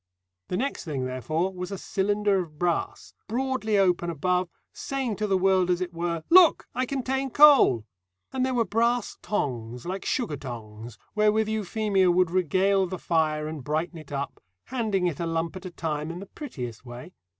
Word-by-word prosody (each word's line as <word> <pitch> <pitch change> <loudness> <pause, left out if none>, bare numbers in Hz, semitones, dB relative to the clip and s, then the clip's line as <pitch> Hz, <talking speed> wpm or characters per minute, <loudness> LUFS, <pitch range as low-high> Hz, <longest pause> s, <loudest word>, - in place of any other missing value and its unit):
The 180 - -2
next 275 +6 -2
thing, 140 -6 -3
therefore, 155 +9 -2
was 180 0 -5
a 195 - -3
cylinder 205 +1 +1
of 160 -4 -6
brass, 175 +1 -2
broadly 240 -2 0
open 180 -3 +2
above, 180 +3 0 0.2
saying 265 -5 -3
to 215 - -1
the 195 -1 +2
world, 185 -1 +3
as 175 -1 +2
it 180 -1 -4
were, 170 -1 -2
"Look! 355 -2 +7
I 255 0 -1
contain 265 0 -1
coal." 275 - +6 0.5
And 260 -1 0
there 260 -1 0
were 230 -2 +2
brass 235 +3 0
tongs 125 - -3
like 185 +2 -4
sugar 230 - -1
tongs 115 -3 -8 0.2
wherewith 215 0 +3
Euphemia 210 -3 +1
would 175 -1 +3
regale 185 +2 +2
the 185 +1 -5
fire 155 -3 0
and 155 -3 -6
brighten 160 +4 -2
it 155 -2 -13
up, 140 0 -4 0.2
handing 220 -7 -1
it 170 -5 -1
a 170 - -1
lump 165 +1 -2
at 185 0 -8
a - - -6
time 155 -2 -3
in 170 - -5
the 195 - -7
prettiest 130 - -7
way. 125 +8 -10
180 Hz, 180 wpm, -26 LUFS, 155-215 Hz, 0.5 s, Look